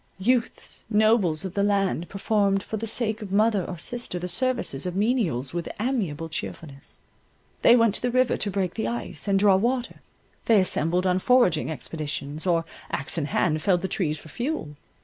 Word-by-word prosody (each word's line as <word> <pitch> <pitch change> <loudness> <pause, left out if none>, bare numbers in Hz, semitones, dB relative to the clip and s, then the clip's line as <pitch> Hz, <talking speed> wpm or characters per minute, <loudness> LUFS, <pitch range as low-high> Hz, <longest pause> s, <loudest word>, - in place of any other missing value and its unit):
Youths, 235 +5 -1
nobles 210 -6 +2
of 185 - -5
the 200 - 0
land, 195 -4 0
performed 200 -1 +1
for - - -5
the 225 +1 -3
sake 220 0 -1
of 205 -3 -7
mother 210 -1 +3
or 175 - -6
sister, 240 +2 -3
the 180 +1 -4
services 185 - +1
of 180 - -4
menials 195 - 0
with 170 -1 -3
amiable 205 - -1
cheerfulness. 155 -2 -7 0.6
They 235 - +7
went 230 -4 +4
to - - -5
the 245 - 0
river 255 +1 +2
to 210 - -1
break 190 -2 -1
the 110 - -2
ice, 120 - -4
and 200 -1 +3
draw 195 -1 +5
water: 245 +4 -1 0.4
they 225 -3 +5
assembled 180 -1 +1
on 185 0 +2
foraging 215 -10 +3
expeditions, 150 +1 -4
or 165 -2 +2 0.2
axe 140 +4 -2
in 150 - -1
hand 155 +2 0
felled 180 0 +2
the - - 0
trees 160 -5 -1
for 155 - -13
fuel. 245 - -3
190 Hz, 185 wpm, -25 LUFS, 165-220 Hz, 0.6 s, They